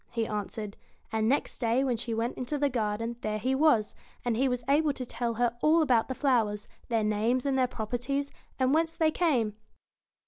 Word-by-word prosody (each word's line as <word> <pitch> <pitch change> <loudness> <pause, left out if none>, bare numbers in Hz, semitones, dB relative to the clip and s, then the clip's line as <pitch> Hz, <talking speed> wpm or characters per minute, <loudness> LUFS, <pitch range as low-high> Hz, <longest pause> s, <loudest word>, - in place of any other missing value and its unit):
he 230 -1 -1
answered; 210 0 -5 0.3
and 220 0 +1
next 280 - 0
day 235 +2 +2
when 255 -3 +1
she 230 +1 -4
went 230 +2 -1
into 255 +4 -3
the 285 -1 +1
garden 230 0 -2
there 215 0 -1
he 255 +5 0
was, 265 -7 +3 0.3
and 240 -2 +1
he 265 +4 +2
was 250 -1 -2
able 295 +2 +3
to 260 -2 -5
tell 235 -1 -3
her 240 0 +1
all 320 +2 +5
about 245 -6 +3
the 260 - -4
flowers, 225 -7 +1 0.2
their 225 -2 +1
names 220 +5 +1
and 275 -1 +1
their 260 -1 +3
properties, 250 +5 -3 0.3
and 260 +1 +2
whence 325 +1 +1
they 315 -1 +2
came. 260 -12 +1
245 Hz, 200 wpm, -29 LUFS, 225-275 Hz, 0.3 s, all